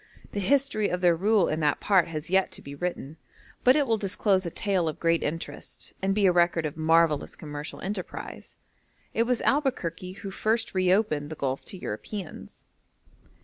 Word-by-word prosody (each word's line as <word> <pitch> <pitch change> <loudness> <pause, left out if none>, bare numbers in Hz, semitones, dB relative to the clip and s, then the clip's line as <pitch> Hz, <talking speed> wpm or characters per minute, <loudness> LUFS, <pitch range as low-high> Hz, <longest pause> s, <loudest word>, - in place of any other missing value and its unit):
The 205 - -3
history 255 -1 +2
of 180 - -2
their 175 -2 +5
rule 200 +2 +3
in 155 - -1
that 150 -3 +1
part 190 -4 +3
has 165 +1 -5
yet 190 0 +3
to - - -9
be 140 - -8
written, 160 -1 -4 0.5
but 255 +1 +6
it 295 -2 +3
will 225 -3 +1
disclose 195 -1 +1
a - - -1
tale 185 -1 0
of 155 - -7
great 165 0 +2
interest, 165 +3 -5
and 195 0 +1
be 205 -1 +3
a 185 - +6
record 175 -2 +2
of 150 - -3
marvellous 160 -1 +2
commercial 150 0 -7
enterprise. 190 -1 -6 0.6
It 230 +1 +1
was 250 -2 +1
Albuquerque 185 - 0
who 195 - -4
first 225 +3 0
reopened 185 -5 +2
the 155 - -5
Gulf 135 -2 -2
to 190 - -6
Europeans. 165 - -7
180 Hz, 180 wpm, -27 LUFS, 160-205 Hz, 0.6 s, but